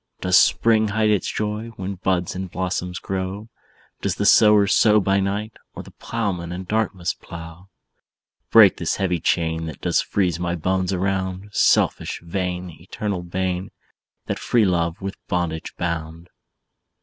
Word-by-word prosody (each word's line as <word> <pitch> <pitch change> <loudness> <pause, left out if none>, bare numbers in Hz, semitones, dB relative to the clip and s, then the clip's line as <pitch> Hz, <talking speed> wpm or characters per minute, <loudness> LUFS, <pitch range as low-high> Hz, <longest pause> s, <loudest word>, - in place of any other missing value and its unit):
"Does 90 0 +2
spring 110 +3 +4
hide 105 +1 +1
its 105 -4 0
joy, 105 +1 -3
When 95 0 -4
buds 90 -1 -1
and 95 0 -5
blossoms 90 0 -3
grow? 95 +3 -4 0.5
Does 100 -2 -1
the 100 - -2
sower 105 -1 +6
Sow 105 +1 +4
by 100 0 +2
night, 100 +3 -2 0.2
Or - - -7
the - - -14
plowman 95 -7 -3
in 90 +1 -5
darkness 95 -3 -1
plough? 85 +3 -11 0.8
"Break - - +7
this - - -1
heavy 90 -3 0
chain, 80 0 0
That 80 - -8
does - - +1
freeze 90 -5 -1
my 85 0 -1
bones 95 +2 -1
around! 95 +1 -2
Selfish, - - +2
vain, 90 0 -3
Eternal 95 +1 -4
bane, 90 +1 -3 0.6
That - - -3
free 115 -3 +2
love 85 -1 0
with 100 0 -4
bondage 85 -3 -2
bound." 85 0 -4
95 Hz, 150 wpm, -22 LUFS, 90-100 Hz, 0.8 s, Break